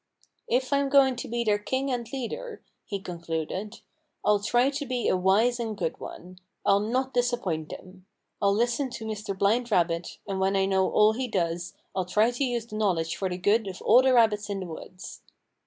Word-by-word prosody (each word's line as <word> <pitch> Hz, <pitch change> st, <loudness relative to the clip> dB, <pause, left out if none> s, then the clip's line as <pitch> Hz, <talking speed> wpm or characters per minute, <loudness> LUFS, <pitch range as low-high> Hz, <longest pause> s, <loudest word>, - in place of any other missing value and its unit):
"If 255 Hz, +3 st, 0 dB
I'm 280 Hz, 0 st, +2 dB
going 270 Hz, -2 st, +5 dB
to -, -, -5 dB
be 235 Hz, +1 st, -1 dB
their 210 Hz, -2 st, +2 dB
king 265 Hz, +5 st, -2 dB
and 240 Hz, -2 st, -3 dB
leader," 430 Hz, -, -5 dB, 0.2 s
he 200 Hz, -, -4 dB
concluded, 170 Hz, +3 st, -5 dB, 0.4 s
"I'll 210 Hz, -1 st, +4 dB
try 240 Hz, +6 st, +2 dB
to 290 Hz, 0 st, -4 dB
be 250 Hz, -1 st, -1 dB
a -, -, +3 dB
wise 205 Hz, +7 st, +3 dB
and 220 Hz, -3 st, -3 dB
good 165 Hz, -4 st, -3 dB
one. 180 Hz, +1 st, -10 dB, 0.3 s
I'll 200 Hz, 0 st, +5 dB
not 255 Hz, +5 st, -1 dB
disappoint 235 Hz, -11 st, -1 dB
them. 185 Hz, 0 st, -11 dB, 0.3 s
I'll 200 Hz, 0 st, +3 dB
listen 240 Hz, +4 st, 0 dB
to 225 Hz, -2 st, -7 dB
Mr. 210 Hz, -2 st, -4 dB
Blind 230 Hz, +5 st, +2 dB
Rabbit, 170 Hz, -4 st, 0 dB
and 195 Hz, -1 st, -2 dB
when 190 Hz, +1 st, +1 dB
I 195 Hz, 0 st, +3 dB
know 190 Hz, -1 st, +2 dB
all 215 Hz, +1 st, +4 dB
he 255 Hz, +3 st, -2 dB
does 170 Hz, -4 st, -2 dB, 0.2 s
I'll 185 Hz, -1 st, 0 dB
try 215 Hz, +6 st, +2 dB
to 245 Hz, +3 st, -2 dB
use 240 Hz, -3 st, -1 dB
the 215 Hz, -2 st, -7 dB
knowledge 175 Hz, -6 st, 0 dB
for 190 Hz, -, -2 dB
the 180 Hz, -, -3 dB
good 205 Hz, +4 st, +2 dB
of 185 Hz, -1 st, -6 dB
all 245 Hz, +3 st, +7 dB
the 260 Hz, -1 st, +3 dB
rabbits 215 Hz, -3 st, +3 dB
in 200 Hz, -1 st, -3 dB
the -, -, -4 dB
woods." 180 Hz, +2 st, -9 dB
210 Hz, 205 wpm, -27 LUFS, 190-245 Hz, 0.4 s, all